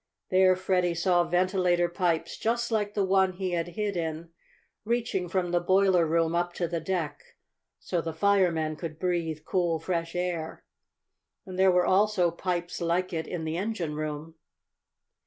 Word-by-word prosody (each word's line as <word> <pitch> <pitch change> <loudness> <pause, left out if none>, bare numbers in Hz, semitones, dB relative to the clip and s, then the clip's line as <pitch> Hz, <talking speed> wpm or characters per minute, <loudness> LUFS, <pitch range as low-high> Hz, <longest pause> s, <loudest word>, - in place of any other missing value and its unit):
There 185 0 +5
Freddie 180 -2 0
saw 175 +1 +3
ventilator 180 0 +2
pipes, 175 -2 -1 0.3
like 210 -2 -1
the 200 -2 +2
one 190 0 +3
he 185 0 -3
had 170 -1 -1
hid 210 -2 -1
in, 165 -1 -3 0.5
reaching 225 -5 -1
from 180 -1 -1
the 175 - +3
boiler 185 -1 +3
room 165 +1 +1
up 175 0 0
to 175 - -2
the 170 0 -2
deck, 165 -2 -3 0.6
so 175 - -2
the 165 - -4
firemen 165 -4 +2
could 160 -2 -6
breathe 165 -3 -2
cool, 175 -3 +1
fresh 165 0 -3
air. 175 -3 -3 0.8
And 185 -2 -7
there 190 0 +6
were 180 0 +3
also 190 -3 +3
pipes 175 0 -3
like 175 +2 0
it 160 -1 -3
in 175 -3 -4
the 160 +1 -2
engine 190 -6 -2
room. 155 +1 -5
175 Hz, 155 wpm, -28 LUFS, 165-185 Hz, 0.8 s, there